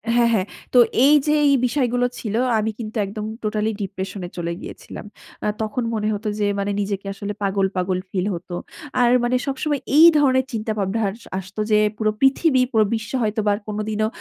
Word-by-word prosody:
হ্যাঁ, 240 Hz, -1 st, +4 dB
হ্যাঁ। 190 Hz, -4 st, +1 dB, 0.3 s
তো 250 Hz, -, +7 dB, 0.3 s
এই 290 Hz, -, +6 dB
যে 300 Hz, -, +3 dB
এই 280 Hz, -, +5 dB
বিষয়গুলো 245 Hz, -2 st, +1 dB
ছিল, 215 Hz, -2 st, -3 dB, 0.2 s
আমি 220 Hz, +1 st, -1 dB
কিন্তু 225 Hz, 0 st, -5 dB
একদম 210 Hz, +2 st, -6 dB, 0.2 s
টোটালি 215 Hz, 0 st, 0 dB
ডিপ্রেশন 195 Hz, 0 st, -5 dB
এ -, -, -12 dB
চলে 170 Hz, 0 st, -2 dB
গিয়েছিলাম। -, -, -9 dB, 0.4 s
আ -, -, +1 dB
তখন 220 Hz, +3 st, -2 dB
মনে 215 Hz, -1 st, -1 dB
হত 205 Hz, +2 st, -6 dB
যে 205 Hz, -, +1 dB
মানে, 200 Hz, +1 st, -1 dB
নিজেকে 200 Hz, -1 st, -3 dB
আসলে 200 Hz, +1 st, -5 dB
পাগল, 195 Hz, 0 st, +1 dB
পাগল 185 Hz, 0 st, 0 dB
ফিল 185 Hz, -1 st, -1 dB
হত। 175 Hz, +1 st, -8 dB, 0.5 s
আর 240 Hz, -1 st, +4 dB
মানে 240 Hz, +1 st, +1 dB
সবসময় 280 Hz, +1 st, -1 dB, 0.2 s
এই 320 Hz, -, +9 dB
ধরনের 260 Hz, -3 st, +3 dB
চিন্তাভাবনা 215 Hz, -2 st, -2 dB
আর 195 Hz, -, -2 dB, 0.3 s
আসত 190 Hz, +2 st, -12 dB
যে, 210 Hz, -, +5 dB, 0.2 s
পুরো 215 Hz, -1 st, +1 dB
পৃথিবী, 270 Hz, 0 st, +4 dB
পুরো 220 Hz, -2 st, +4 dB
বিশ্ব 215 Hz, -1 st, -5 dB
হয়তোবা 210 Hz, -1 st, +1 dB
কোনদিনও 215 Hz, 0 st, -1 dB
215 Hz, 180 wpm, -22 LUFS, 200-240 Hz, 0.5 s, এই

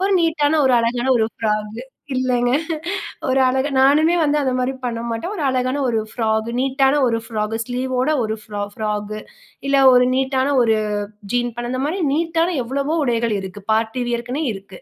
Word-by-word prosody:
ஒரு 390 Hz, +1 st, +2 dB
நீட்டான, 310 Hz, -2 st, +2 dB
ஒரு 260 Hz, -, +3 dB
அழகான 240 Hz, +2 st, -1 dB
ஒரு 220 Hz, -, +2 dB
ஃப்ராக் 210 Hz, -1 st, -1 dB
கு. -, -, -5 dB, 0.3 s
இல்லங்க. 250 Hz, -1 st, +1 dB, 0.8 s
ஒரு 265 Hz, +1 st, +2 dB
அழகா, 265 Hz, +3 st, 0 dB
நானுமே 305 Hz, +5 st, +4 dB
வந்து 295 Hz, 0 st, +2 dB
அந்த 265 Hz, -2 st, 0 dB
மாரி 255 Hz, +1 st, 0 dB
பண்ண 230 Hz, -2 st, -2 dB
மாட்டேன். 230 Hz, -, -3 dB
ஒரு 325 Hz, -, -4 dB
அழகான 255 Hz, +2 st, 0 dB
ஒரு 225 Hz, -2 st, +1 dB
ஃப்ராகு. 220 Hz, -1 st, -1 dB
நீட்டான 270 Hz, +1 st, +2 dB
ஒரு 230 Hz, -1 st, +1 dB
ஃப்ராகு, 220 Hz, -1 st, -3 dB
ஸ்லீவ் 250 Hz, +2 st, -3 dB
வோட 255 Hz, +4 st, +1 dB
ஒரு 220 Hz, 0 st, -1 dB
ஃப் -, -, -21 dB, 0.2 s
ஃப்ராகு. 210 Hz, 0 st, -3 dB, 0.5 s
இல்ல 275 Hz, -, +2 dB, 0.2 s
ஒரு 250 Hz, 0 st, +6 dB
நீட்டான 265 Hz, +1 st, +1 dB
ஒரு 225 Hz, -1 st, +3 dB, 0.6 s
"ஜீன்ஸ்" 245 Hz, 0 st, +1 dB
பண்ண, 240 Hz, 0 st, -4 dB
அந்த 255 Hz, +1 st, -2 dB
மாரி 335 Hz, +6 st, -2 dB
நீட்டான 330 Hz, +3 st, +1 dB
எவ்வளவோ 275 Hz, +5 st, -2 dB
உடைகள் 235 Hz, -3 st, 0 dB
இருக்கு. 190 Hz, +1 st, -8 dB
பார்ட்டி 225 Hz, +3 st, 0 dB
வியர்க்குனே 240 Hz, +5 st, -2 dB
இருக்கு 195 Hz, -1 st, -11 dB
250 Hz, 175 wpm, -20 LUFS, 225-275 Hz, 0.8 s, ஒரு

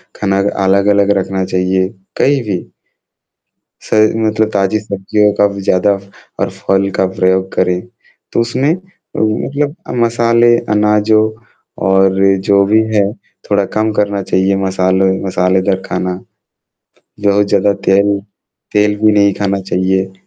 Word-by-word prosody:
खाना 100 Hz, -1 st, -1 dB, 0.3 s
अलग-अलग 100 Hz, +1 st, +3 dB
रखना 95 Hz, 0 st, -2 dB
चाहिए, 95 Hz, 0 st, 0 dB, 0.3 s
कहीं 140 Hz, 0 st, +2 dB
भी। 100 Hz, -5 st, -5 dB, 1.1 s
सही 110 Hz, 0 st, +2 dB
मतलब 110 Hz, 0 st, +1 dB
ताज़ी 100 Hz, +1 st, +1 dB
सब्जियों 105 Hz, 0 st, 0 dB
का 105 Hz, -, +3 dB
भी 100 Hz, -, -6 dB
ज़्यादा 95 Hz, +2 st, +2 dB, 0.5 s
और -, -, 0 dB
फल 95 Hz, 0 st, -1 dB
का 95 Hz, -, +2 dB
प्रयोग 95 Hz, 0 st, 0 dB
करें। 90 Hz, -1 st, +1 dB, 0.5 s
तो -, -, +1 dB
उसमें 130 Hz, +6 st, 0 dB
अ, 185 Hz, +1 st, -14 dB
मतलब 140 Hz, +7 st, -1 dB, 0.3 s
मसाले, 115 Hz, 0 st, +3 dB
अनाज़ों 105 Hz, +1 st, +2 dB, 0.6 s
और 95 Hz, 0 st, +3 dB, 0.3 s
जो 100 Hz, 0 st, +4 dB
भी 110 Hz, +2 st, +3 dB
है, 100 Hz, -1 st, +2 dB, 0.4 s
थोड़ा 100 Hz, -1 st, +2 dB
कम 110 Hz, 0 st, +1 dB
करना 100 Hz, -1 st, -1 dB
चाहिए, 95 Hz, +1 st, +1 dB
मसालों 95 Hz, 0 st, +1 dB, 0.2 s
मसालेदार 95 Hz, +1 st, 0 dB
खाना। 90 Hz, 0 st, -2 dB, 1.1 s
बहुत 100 Hz, 0 st, +3 dB
ज़्यादा 100 Hz, 0 st, +2 dB
तेल 100 Hz, +1 st, +3 dB, 0.6 s
तेल 105 Hz, 0 st, +2 dB
भी 110 Hz, 0 st, +4 dB
नहीं 100 Hz, -1 st, +3 dB
खाना 100 Hz, 0 st, -1 dB
चाहिए। 95 Hz, 0 st, -1 dB
100 Hz, 125 wpm, -14 LUFS, 95-110 Hz, 1.1 s, जो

